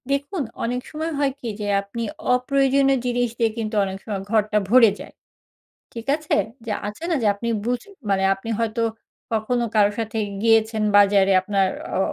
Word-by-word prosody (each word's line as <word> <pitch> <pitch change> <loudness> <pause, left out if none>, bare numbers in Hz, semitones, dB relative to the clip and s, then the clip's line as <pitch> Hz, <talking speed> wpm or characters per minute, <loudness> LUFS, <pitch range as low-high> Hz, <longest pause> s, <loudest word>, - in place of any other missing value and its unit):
দেখুন, 285 +5 -1 0.2
অনেক 245 +2 -1
সময় 315 +2 -3
হয় 280 -1 +2
কি 245 - -6
যে 205 - -3
আপনি 200 +4 -6 0.3
অপ্রয়োজনীয় 275 +1 +2
জিনিস 245 -1 0
দিয়ে 225 -1 +2
কিন্তু 220 -1 -3
অনেক 190 0 -5
সময় 200 -3 -3
ঘরটা 215 -1 +2
ভরে 230 -2 +7
যায়। - - -10 0.8
ঠিক 230 +1 -8
আছে? 310 0 -1 0.3
যে 225 - -3 0.2
আছে 210 +10 -8
না 335 - +2
যে - - +3
আপনি 235 +3 -4 0.2
বুঝ 245 0 -1 0.3
মানে 195 -1 +2
আপনি 195 +4 -9
হয়তো 230 0 0 0.5
কখনো 230 +2 0
কারো 205 -1 +5
সাথে 225 0 -3 0.3
গিয়েছেন 220 -1 +3
বাজারে। 200 -1 +5
আপনার 195 0 +1 0.3
অ - - +1
230 Hz, 170 wpm, -22 LUFS, 210-255 Hz, 0.8 s, ভরে